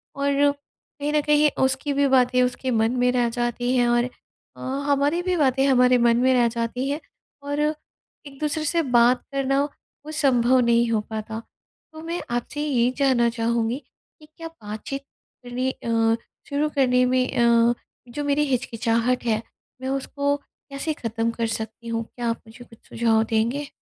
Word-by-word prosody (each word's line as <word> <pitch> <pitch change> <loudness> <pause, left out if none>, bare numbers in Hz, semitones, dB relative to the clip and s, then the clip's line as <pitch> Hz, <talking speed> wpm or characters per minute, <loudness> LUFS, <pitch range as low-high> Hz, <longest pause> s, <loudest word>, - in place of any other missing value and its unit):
और 280 +1 +2
कहीं 285 +1 -8
न 300 - +3
कहीं 300 0 +5
उसकी 265 +2 0
भी 280 0 +2
बातें 250 -1 +3
उसके 255 +1 -2
मन 225 0 +2
में 250 0 +3
रह 245 -2 +1
जाती 245 +1 -1
हैं 240 -1 +3
और 240 +1 +2 0.5
अ, - - -11 0.3
हमारी 285 +5 +2
भी 360 -1 0
बातें 270 -2 +2
हमारे 250 -1 +5
मन 235 -1 +3
में 260 +1 +3
रह 245 -2 +4
जाती 235 +3 -2
हैं 290 +2 -1 0.4
और 285 +1 -3 0.7
एक 275 -1 -13
दूसरे 305 +1 -1
से 335 +2 +2 0.2
बात 240 +2 +4
करना 275 0 +1 0.4
वो 310 - -7
संभव 260 -4 +3
नहीं 235 -1 +3
हो 220 - +2
पाता। 220 0 -5 0.5
तो 315 - -9
मैं 340 +2 -3
आपसे 260 +5 -3
ये 255 -5 +2
जानना 260 -4 +3
चाहूँगी 230 +1 -1 0.4
कि 305 - -16
क्या 330 - -6
बातचीत 275 -2 -7 0.4
करनी 250 +2 -2
अ, 235 - -8 0.6
शुरू 290 +2 0
करने 250 -2 +3
में 255 0 +2
अ, 235 0 +4 0.4
जो 290 +5 -4
मेरी 290 +1 +2
हिचकिचाहट 235 -1 0
है 220 -1 +1 0.4
मैं 260 - -3
उसको 280 +1 -1
कैसे 285 +2 -6
खत्म 230 -2 -2
कर 230 0 -2
सकती 225 +1 -5
हूँ? 230 0 -2
क्या 240 -1 -2
आप 230 - -3
मुझे 235 +2 -13
कुछ 230 -1 -18
सुझाव 225 -1 +2
देंगे? 230 +6 -1
250 Hz, 170 wpm, -24 LUFS, 235-280 Hz, 0.7 s, कहीं